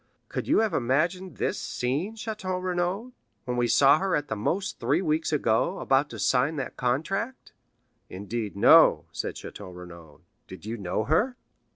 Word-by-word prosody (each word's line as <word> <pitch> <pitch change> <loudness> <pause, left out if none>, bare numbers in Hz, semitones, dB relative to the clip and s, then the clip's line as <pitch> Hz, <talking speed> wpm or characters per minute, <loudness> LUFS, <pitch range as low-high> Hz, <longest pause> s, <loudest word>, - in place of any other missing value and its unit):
Could - - -4
you - - +4
have 220 -2 0
imagined 155 - 0
this - - -1
scene, 145 - -2
Château 210 -4 -4
Renaud, 185 +6 -2 0.3
when 125 - -2
we 120 0 +1
saw 140 +5 +5
her, 190 -1 0
at 145 0 -2
the 110 - -1
most 190 - -2
three 135 +7 +1
weeks 155 -1 0
ago, 150 - +1
about 135 +2 +1
to - - -8
sign 135 +5 +2
that 135 - -5
contract?" 180 - -2 0.6
"Indeed, 105 +2 -5
no," 100 - +6
said - - -4
Château 100 -3 -9
Renaud." 85 -4 -12 0.3
"Did 95 +1 -11
you 110 +2 -4
know 100 0 -2
her?" 210 - +1
145 Hz, 165 wpm, -27 LUFS, 115-185 Hz, 0.6 s, no